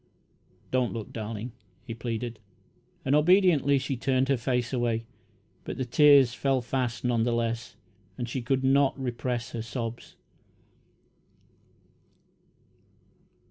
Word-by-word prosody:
"Don't 125 -1 +1
look, 115 -3 -6
darling," 110 +1 -5 0.3
he 115 - -6
pleaded, 115 0 -4 0.7
and, 135 - +2
obediently, 150 -3 +4
she 135 0 -2
turned 130 +1 +1
her 135 - +4
face 125 +1 -1
away, 115 -2 0 0.6
but - - -6
the 130 - -2
tears 140 -1 +6
fell 135 0 +1
fast, 120 -1 -2
none 120 -2 +1
the 120 +1 +1
less, 115 0 -2 0.4
and 120 - -3
she 125 +2 -3
could 130 +2 0
not 135 +1 +3
repress 120 -2 -3
her 115 - -4
sobs. 115 +1 -6
125 Hz, 120 wpm, -27 LUFS, 115-135 Hz, 0.7 s, tears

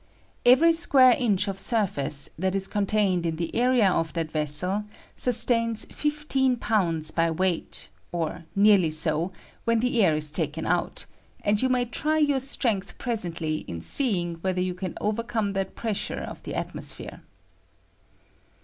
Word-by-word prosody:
Every 295 +7 +6
square 275 -6 +5
inch 205 -5 +1
of 195 -1 -3
surface 155 - -1
that 190 +3 -2
is 195 0 -2
eontained 200 -3 0
in 165 -1 -2
the 165 0 -5
area 245 -3 +3
of 165 -4 0
that 165 -2 -3
vessel 160 +7 +4 0.3
sustains 230 -2 +2
fif 300 0 -3
teen 265 -3 +2
pounds 170 -9 +2
by 165 0 +1
weight, 175 +1 -2 0.2
or 165 -1 -4
nearly 200 -5 +4
bo, 160 +3 -1 0.3
when 230 0 +1
the 245 0 +1
air 160 -5 +3
is 150 -1 +1
tnlsen 160 -1 -2
out, 175 0 -1 0.4
and 205 0 +2
you 260 - +1
may 250 -1 +1
try 305 +6 -1
your 290 -3 +2
strength 230 -7 -1
presently 170 -10 -3
in 85 - -6
seeing 175 - 0
whether 185 0 -1
you 180 0 -1
can 180 0 -6
overcome 215 -1 -2
that 195 -1 -3
pressure 215 -3 -3
of - - -9
the - - -7
atmosphere. - - -5
195 Hz, 150 wpm, -25 LUFS, 170-235 Hz, 0.4 s, Every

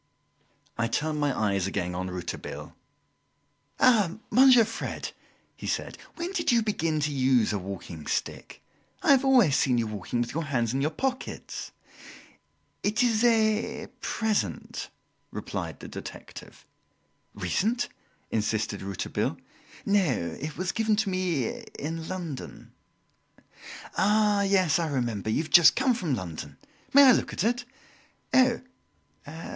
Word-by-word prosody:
I 115 - +2
turned 150 +5 -1
my 145 -2 0
eyes 100 -3 +1
again 90 -2 -2
on 90 +1 -3
Rouletabille. 90 -1 -6 1.0
"Ah, 210 -7 +4
Monsieur 255 -3 +7
Fred!" 225 - -5 0.4
he - - -7
said, - - -2 0.2
"when 345 +2 -4
did 335 -7 +1
you 235 -1 +3
begin 165 -7 0
to 150 0 0
use 130 -5 +3
a 100 - -1
walking 90 -4 -7
stick? - - -4 0.4
I - - +5
have 275 -1 +5
always 250 - +5
seen 125 -3 +2
you 115 - +1
walking 110 +2 -3
with 120 0 -2
your 165 +1 -2
hands 120 -5 0
in 135 - 0
your 150 - +2
pockets!" 260 - -4 1.1
"It 210 +4 +1
is 230 -2 +2
a 220 -2 +2
present," 220 -2 -2 0.4
replied - - -5
the - - -8
detective. - - -10 0.7
"Recent?" 230 +5 0 0.4
insisted 110 -1 -1
Rouletabille. 100 -1 -2 0.5
"No, 170 - +1
it 150 +1 -5
was 185 +1 -1
given 220 -1 +1
to 205 -2 0
me 175 -9 -1 0.2
in 160 +2 -4
London." 170 -7 -6 1.3
"Ah, 210 0 +3
yes, 185 -5 +3
I 165 - 0
remember 120 -7 -2
you 130 +8 +1
have 155 - -11
just 170 +3 +8
come 265 -1 +3
from 175 - -1
London. 85 -7 -7 0.3
May 280 +1 +8
I 265 - +9
look - - +1
at - - -1
it?" 245 +2 0 0.7
"Oh! 255 -2 +4
165 Hz, 135 wpm, -27 LUFS, -, 1.3 s, I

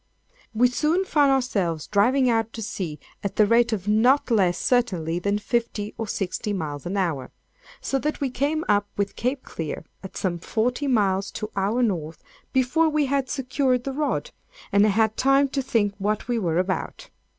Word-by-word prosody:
We 235 +2 +4
soon 315 +9 +1
found 290 -6 +3
ourselves 195 - 0
driving 250 +6 +3
out 225 -2 +1
to 225 - -5
sea 185 -8 -4 0.2
at 200 - -3
the 215 - +5
rate 235 +2 +3
of 205 -3 -3
not 245 +6 +3
less, 185 -5 +3
certainly, 180 -10 0
than 200 +2 0
fifty 215 -1 -2
or 225 - -4
sixty 200 +2 -2
miles 150 -5 -4
an 195 +3 -2
hour, 160 -9 -1 0.5
so 270 - -1
that 300 +3 -2
we 275 -3 -1
came 290 +5 -1
up 205 0 +2
with 200 -1 -1
Cape 255 +3 -2
Clear, 160 -1 -6 0.2
at 190 - -9
some 175 -3 -1
forty 245 - -1
miles 200 -6 +1
to 215 - -5
our 205 +6 +1
North, 165 -8 -2 0.3
before 275 +5 +2
we 300 -1 +1
had 270 -1 0
secured 260 -2 0
the 270 - -3
rod, 305 - -1 0.4
and 200 +1 +5
had 220 +1 +2
time 275 +1 +4
to 275 0 -1
think 220 -6 +1
what 210 +3 -1
we 240 -2 0
were 170 -5 0
about. 185 -3 -2
225 Hz, 180 wpm, -24 LUFS, 195-260 Hz, 0.5 s, the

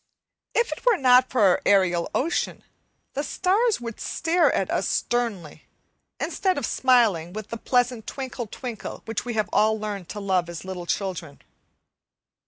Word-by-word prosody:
If 470 0 +2
it - - -6
were 485 -4 +4
not 255 -2 +5
for 255 - 0
our 190 -3 +4
aerial 185 -4 +3
ocean, 330 +7 -1 0.5
the 280 - -1
stars 410 - +1
would 230 -2 -7
stare 340 +2 +1
at - - -1
us - - 0
sternly, 210 -11 -2 0.5
instead 375 -2 0
of 280 - -1
smiling 220 -12 +2
with 215 0 -7
the 230 - -4
pleasant 245 -1 0
twinkle 260 -3 -5
twinkle 235 0 -7
which 225 +1 -3
we 240 -2 -3
have 215 -1 +1
all 220 0 +3
learned 205 -4 -5
to 210 - -5
love 185 -3 0
as 170 +1 -7
little 180 -2 -6
children. 175 -8 -3
225 Hz, 160 wpm, -25 LUFS, 190-255 Hz, 0.5 s, not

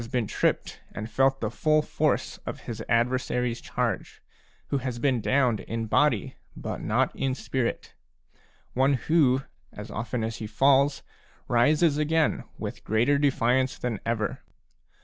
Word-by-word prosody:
been 125 -3 0
tripped - - -1
and 110 +1 -6
felt 135 0 +2
the 110 -1 -1
full 155 +4 +2
force - - 0
of - - -7
his - - -6
adversary's 125 0 +1
charge, - - -3 0.5
who 140 - 0
has 125 -2 -4
been 125 -1 +1
downed 125 -3 +2
in 115 0 -4
body 120 -1 +1 0.2
but - - -5
not - - +1
in 130 -1 -1
spirit, 130 -3 -3 0.8
one 135 +2 +3
who, 135 -1 +2 0.3
as 105 +1 -9
often 115 +1 -3
as 110 0 -3
he 110 - -5
falls, 135 +5 +3 0.4
rises 150 +5 +3
again 155 +1 +1
with - - -6
greater 120 +7 +2
defiance 130 0 +2
than 120 -4 -3
ever. 110 -3 -2
130 Hz, 140 wpm, -27 LUFS, 115-140 Hz, 0.8 s, one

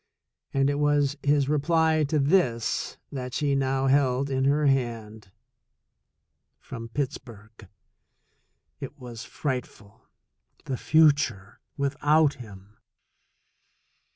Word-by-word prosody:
And 135 0 +1
it 145 - -2
was 145 -1 +2
his 145 -1 +2
reply 160 +1 +2
to 150 +2 -1
this 140 - 0
that 125 -3 -6
she 145 -2 0
now 135 0 0
held 135 0 +2
in 130 0 0
her 145 +2 +2
hand 115 -6 -2 0.6
— - - -53
from 115 -1 -9
Pittsburgh! 115 -5 -6 1.1
It - - -8
was 120 -2 -9
frightful! 125 -7 -6 0.6
The 130 - -3
future 140 -12 +2 0.2
without 145 +2 +2
him 105 -1 -14
135 Hz, 100 wpm, -26 LUFS, 115-145 Hz, 1.1 s, was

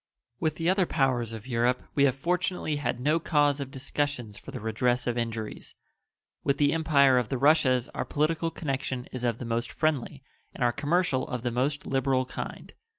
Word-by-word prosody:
With 155 -1 0
the 165 0 -2
other 185 -1 +3
powers 130 -6 +1
of 110 -2 -7
Europe 125 0 +1
we 140 - +4
have 130 -2 +2
fortunately 175 0 -1
had 125 -4 -2
no 150 +6 +2
cause 145 -3 +2
of 140 -2 -4
discussions 135 -4 -3
for - - -11
the - - -6
redress 120 +3 0
of 120 - 0
injuries. 115 -2 -4 0.7
With 140 - +1
the 145 -1 +3
Empire 140 -5 +4
of 120 - -3
the 135 - -1
Russias 130 -3 +4
our - - -3
political 160 +2 0
connection 135 -5 -3
is 130 -1 -5
of 120 -2 +1
the 125 - -6
most 115 +1 -2
friendly 145 -3 -1 0.3
and - - -2
our 120 - +4
commercial 145 +1 +1
of 125 -2 -4
the 120 - 0
most 140 +5 -1
liberal 135 -1 +1
kind. - - -7
135 Hz, 190 wpm, -28 LUFS, 125-150 Hz, 0.7 s, we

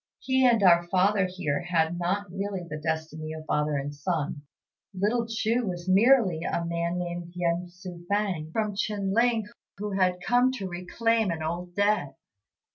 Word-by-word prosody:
He 260 -1 +2
and 230 -4 +3
our 175 -2 +6
father 190 +2 +3
here 165 -6 -2
had 175 -1 0
not 190 +4 0
really 195 -1 -4
the 155 -1 -5
destiny 160 0 -3
of 155 0 -8
father 150 -1 0
and 140 +1 -3
son. 145 -1 -2 0.5
Little 220 +5 0
Chu 225 +2 0
was 175 -1 -5
merely 195 -3 +4
a 170 0 -2
man 170 +1 -1
named 175 -1 -5
Yen 175 0 0
Tzŭ 175 -1 -11
fang, 195 -6 -1
from 215 +2 -1
Chin 200 -1 -1
ling, 230 -1 +2 0.3
who 210 +1 -4
had 185 -2 +1
come 245 +7 +3
to 200 -7 -4
reclaim 215 +5 0
an 160 -2 -3
old 175 +2 -4
debt." 205 -8 +1
180 Hz, 165 wpm, -27 LUFS, 170-205 Hz, 0.5 s, our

